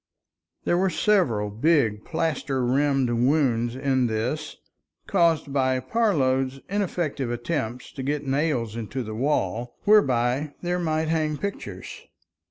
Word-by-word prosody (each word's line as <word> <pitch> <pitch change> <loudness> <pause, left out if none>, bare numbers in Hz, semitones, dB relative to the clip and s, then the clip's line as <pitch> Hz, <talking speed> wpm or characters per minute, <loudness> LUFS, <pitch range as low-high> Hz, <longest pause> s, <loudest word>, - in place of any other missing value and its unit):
There 175 - +2
were 190 +1 +2
several 160 - +1
big 115 -3 +2
plaster 150 -6 -1
rimmed 135 +1 +2
wounds 120 -1 +2
in 130 -2 +1
this, 125 +8 -3 0.5
caused 165 -6 +2
by 130 -2 +2
Parload's 135 - +1
ineffectual 170 -10 -2
attempts 120 -1 -3
to 135 - -7
get 145 +2 -2
nails 135 -5 0
into 115 +3 -4
the 110 -1 -6
wall, 120 -2 -1
whereby 135 - +3
there 175 +1 0
might 160 -2 0
hang 155 -2 0
pictures. 100 - -6
135 Hz, 120 wpm, -25 LUFS, 120-160 Hz, 0.5 s, whereby